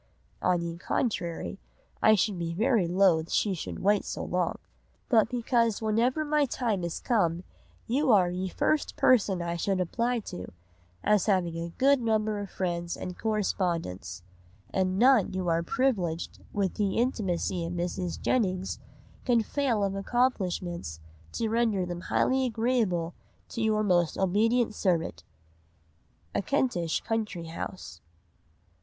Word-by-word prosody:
(on 175 Hz, -1 st, +2 dB
ye 170 Hz, 0 st, -5 dB
contrary 180 Hz, -4 st, -2 dB, 0.4 s
I 215 Hz, -, +6 dB
should 200 Hz, -2 st, 0 dB
be 165 Hz, 0 st, -3 dB
very 220 Hz, -3 st, +2 dB
loth 175 Hz, -3 st, +3 dB
she 205 Hz, -, +1 dB
should 175 Hz, -, -5 dB
wait 205 Hz, +1 st, +3 dB
so -, -, -5 dB
long) -, -, -1 dB, 0.5 s
but 225 Hz, -4 st, +4 dB
because 235 Hz, -3 st, +1 dB
whenever 235 Hz, +7 st, +1 dB
my 295 Hz, -1 st, +2 dB
Time 225 Hz, -7 st, -1 dB
is 170 Hz, -1 st, -3 dB
come 175 Hz, -7 st, +1 dB, 0.4 s
You 265 Hz, +3 st, +2 dB
are 185 Hz, -5 st, +5 dB
ye 185 Hz, +1 st, -3 dB
first 305 Hz, +10 st, 0 dB
person 200 Hz, -8 st, +3 dB
I 170 Hz, 0 st, -2 dB
should 190 Hz, +2 st, 0 dB
apply 235 Hz, +7 st, 0 dB
to, 90 Hz, -, -8 dB, 0.5 s
as 210 Hz, -3 st, +3 dB
having 180 Hz, -5 st, +1 dB
a 170 Hz, 0 st, -4 dB
good 275 Hz, 0 st, +4 dB
Number 215 Hz, -2 st, 0 dB
of 200 Hz, -1 st, -5 dB
Friends 175 Hz, -2 st, -3 dB
and 180 Hz, -, -6 dB
Correspondents; 170 Hz, -, -2 dB, 0.5 s
and 185 Hz, 0 st, 0 dB
none 245 Hz, -3 st, +5 dB
who 185 Hz, -1 st, -2 dB
are 165 Hz, 0 st, +2 dB
priviledged 185 Hz, -7 st, -1 dB
with 195 Hz, -2 st, -1 dB
ye 200 Hz, -2 st, +1 dB
Intimacy 195 Hz, -7 st, 0 dB
of 170 Hz, +1 st, -4 dB
Mrs. 175 Hz, 0 st, -3 dB
Jennings 190 Hz, -6 st, 0 dB, 0.4 s
can 235 Hz, -3 st, +3 dB
fail 240 Hz, -4 st, 0 dB
of 195 Hz, -1 st, 0 dB
Accomplishments 190 Hz, -, -1 dB, 0.3 s
to 225 Hz, -, -1 dB
render 220 Hz, -4 st, +1 dB
them 175 Hz, 0 st, -5 dB
highly 260 Hz, +7 st, +1 dB
agreable 220 Hz, -8 st, 0 dB, 0.4 s
to 230 Hz, -, -4 dB
your 215 Hz, -1 st, +2 dB
most 175 Hz, -5 st, +2 dB
obedient 220 Hz, +5 st, +2 dB
servant." 180 Hz, -6 st, -1 dB, 1.1 s
(_A -, -, 0 dB
Kentish 190 Hz, -, 0 dB
Country 210 Hz, -7 st, -3 dB
House. 165 Hz, -, -7 dB
195 Hz, 140 wpm, -28 LUFS, 175-230 Hz, 1.1 s, I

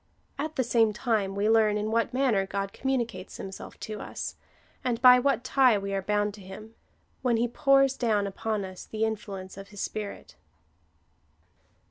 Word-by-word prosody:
At 310 Hz, +2 st, -3 dB
the 260 Hz, -, +1 dB
same 225 Hz, -2 st, +3 dB
time 210 Hz, -4 st, 0 dB
we 200 Hz, +1 st, +1 dB
learn, 220 Hz, -1 st, +4 dB
in 210 Hz, +1 st, -2 dB
what 230 Hz, +1 st, +1 dB
manner 245 Hz, -7 st, +1 dB
God 195 Hz, 0 st, -3 dB
com 265 Hz, -, -3 dB
municates 230 Hz, -8 st, -2 dB
himself 190 Hz, 0 st, -8 dB
to 215 Hz, -1 st, -5 dB
us, -, -, -5 dB, 0.5 s
and 245 Hz, -3 st, 0 dB
by 250 Hz, 0 st, +8 dB
what 275 Hz, -1 st, +1 dB
tie 255 Hz, -4 st, +4 dB
we 200 Hz, 0 st, -4 dB
are 195 Hz, -, 0 dB
bound 205 Hz, +1 st, 0 dB
to 205 Hz, -, -12 dB
him 205 Hz, +4 st, -10 dB, 0.2 s
— -, -, -40 dB
when 245 Hz, -3 st, +2 dB
he 235 Hz, +1 st, +2 dB
pours 275 Hz, +2 st, +3 dB
down 215 Hz, -4 st, +1 dB
upon 205 Hz, +1 st, -2 dB
us 185 Hz, -1 st, -9 dB
the 220 Hz, 0 st, -2 dB
influence 195 Hz, -4 st, -5 dB
of 195 Hz, 0 st, -9 dB
his 205 Hz, -1 st, -8 dB
Spirit. 210 Hz, -2 st, -5 dB
215 Hz, 180 wpm, -28 LUFS, 200-245 Hz, 0.5 s, by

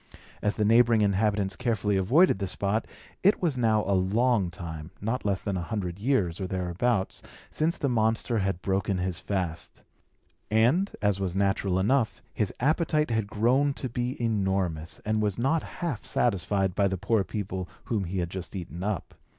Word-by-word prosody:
As 105 Hz, -, 0 dB
the 105 Hz, -, +1 dB
neighbouring 115 Hz, 0 st, +5 dB
inhabitants 100 Hz, -1 st, +1 dB
carefully 110 Hz, -4 st, 0 dB
avoided 115 Hz, -, +4 dB
the 100 Hz, -, -1 dB
spot, 100 Hz, +4 st, -1 dB, 0.3 s
it 200 Hz, +3 st, +4 dB
was 165 Hz, -6 st, 0 dB
now 110 Hz, -3 st, +2 dB
a 100 Hz, -, 0 dB
long 100 Hz, +2 st, +2 dB
time 80 Hz, -2 st, -7 dB
(not 115 Hz, +4 st, -2 dB
less 100 Hz, -1 st, 0 dB
than 100 Hz, -2 st, -2 dB
a 90 Hz, -, -1 dB
hundred 90 Hz, -2 st, -4 dB
years, 100 Hz, -8 st, +1 dB
or 95 Hz, -, -2 dB
thereabouts) 95 Hz, +4 st, -1 dB, 0.3 s
since 160 Hz, +2 st, 0 dB
the 140 Hz, -, 0 dB
monster 115 Hz, -1 st, +1 dB
had 95 Hz, -2 st, -1 dB
broken 95 Hz, 0 st, 0 dB
his 90 Hz, -1 st, -2 dB
fast; 90 Hz, -5 st, -4 dB, 0.7 s
and, 125 Hz, -, +3 dB
as 105 Hz, -2 st, +2 dB
was 95 Hz, -2 st, -2 dB
natural 95 Hz, -1 st, +1 dB
enough, 115 Hz, +4 st, +1 dB
his 105 Hz, -4 st, 0 dB
appetite 155 Hz, +1 st, +1 dB
had 110 Hz, -2 st, 0 dB
grown 130 Hz, +7 st, +2 dB
to 130 Hz, -, -4 dB
be 120 Hz, +2 st, -3 dB
enormous, 95 Hz, -8 st, -1 dB
and 110 Hz, 0 st, +1 dB
was 105 Hz, -3 st, 0 dB
not 135 Hz, +7 st, +2 dB
half 160 Hz, -11 st, -4 dB
satisfied 95 Hz, -3 st, 0 dB
by 100 Hz, +1 st, +2 dB
the 95 Hz, -1 st, -2 dB
poor 105 Hz, +3 st, +1 dB
people 95 Hz, -2 st, -4 dB
whom 105 Hz, -5 st, -1 dB
he 90 Hz, +3 st, -4 dB
had 85 Hz, -1 st, -2 dB
just 95 Hz, +1 st, -6 dB
eaten 85 Hz, -1 st, -6 dB
up. 100 Hz, -2 st, -3 dB
105 Hz, 175 wpm, -27 LUFS, 95-120 Hz, 0.7 s, neighbouring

